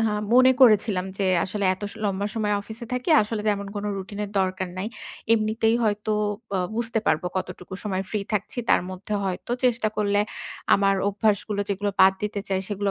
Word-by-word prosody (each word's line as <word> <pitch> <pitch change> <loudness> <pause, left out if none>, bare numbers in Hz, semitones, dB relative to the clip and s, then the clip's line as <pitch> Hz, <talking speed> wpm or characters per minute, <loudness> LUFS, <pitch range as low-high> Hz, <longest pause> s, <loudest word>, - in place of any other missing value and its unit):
আ - - +2 0.3
মনে 255 +1 +7
করেছিলাম 210 -5 +5
যে 195 - +1 0.2
আসলে 200 +2 -3
এত 190 - -16
স - - -13
লম্বা 200 0 0
সময় 210 -2 0
অফিসে 225 +3 -9
থাকি। 250 +4 -2
আসলে 215 +1 -3
তেমন 200 -1 0
কোন 205 - -3
রুটিনের 200 +1 -5
দরকার 185 -1 -1
নাই। 195 - -2 0.5
এমনিতেই 225 +1 +2
হয়তো 215 0 0 0.4
অ্যা 190 - +1 0.2
বুঝতে 230 -1 -1
পারবো 155 - +2
কতটুকু 180 0 -5
সময় 190 -3 -2
ফ্রি 210 - -1
থাকছি। 210 +4 -2
তার - - +5
মধ্যে 190 +3 -5
হয়তো 190 +5 -3
চেষ্টা 235 -3 +2
করলে 205 -1 +2 0.5
আমার 195 0 +3
অভ্যাসগুলো 205 0 0
যেগুলো 205 +1 -1
বাদ 190 0 +8
দিতে 210 -1 -2
চাই 190 -1 0
সেগুলো 205 -1 -1
205 Hz, 175 wpm, -25 LUFS, 195-215 Hz, 0.5 s, বাদ